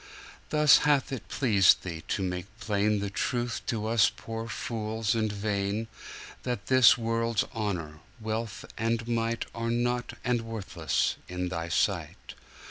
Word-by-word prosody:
Thus 150 -2 +6
hath 145 -2 +2
it 130 -5 -5
pleased 105 -8 +4
Thee 85 -3 -5
to 100 - -1
make 90 0 -3
plainThe 105 -2 0
truth 120 0 -1
to 110 -4 -1
us 110 -2 +4
poor 115 0 -6
fools 110 -1 -2
and 110 -2 0
vain, 100 +1 -2 0.5
That 125 -1 -3
this 130 -2 +6
world's 115 -1 0
honour, 90 -9 -3 0.2
wealth 110 -2 -4
and 115 0 0
mightAre 115 0 -2
nought 120 +1 -1
and 120 -1 +1
worthless 100 -9 -1
in 90 0 -3
Thy 85 -1 -4
sight. 80 - -1
110 Hz, 130 wpm, -28 LUFS, 100-115 Hz, 0.5 s, Thus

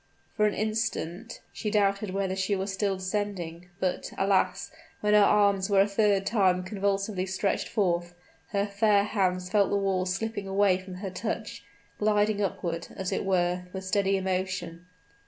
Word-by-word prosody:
For 210 -1 +3
an 210 - -1
instant 220 -2 -3
she 215 - -3
doubted 200 -1 +1
whether 190 0 -1
she 190 +1 0
was 195 +1 -3
still 195 0 0
descending; 185 -3 -3
but, 185 -2 -2
alas! 195 -1 +1 0.3
when 210 0 +2
her 210 - +7
arms 200 -1 +4
were 195 -1 +5
a 200 - +3
third 200 -1 +2
time 185 -5 +2
convulsively 195 0 -1
stretched 190 +1 -1
forth, 175 -3 0 0.3
her 200 -1 0
fair 205 0 +3
hands 185 -3 0
felt 200 -2 +3
the 200 - +1
walls 190 -2 0
slipping 205 +1 -3
away 195 -1 +3
from 185 0 -9
her 190 +1 -5
touch 205 +4 -4 0.4
gliding 210 0 +2
upward, 170 -4 -2
as 190 -1 -3
it - - -1
were, 180 -1 +1
with 190 0 -5
steady 195 +1 +2
emotion. 185 -2 -3
195 Hz, 160 wpm, -28 LUFS, 185-205 Hz, 0.4 s, her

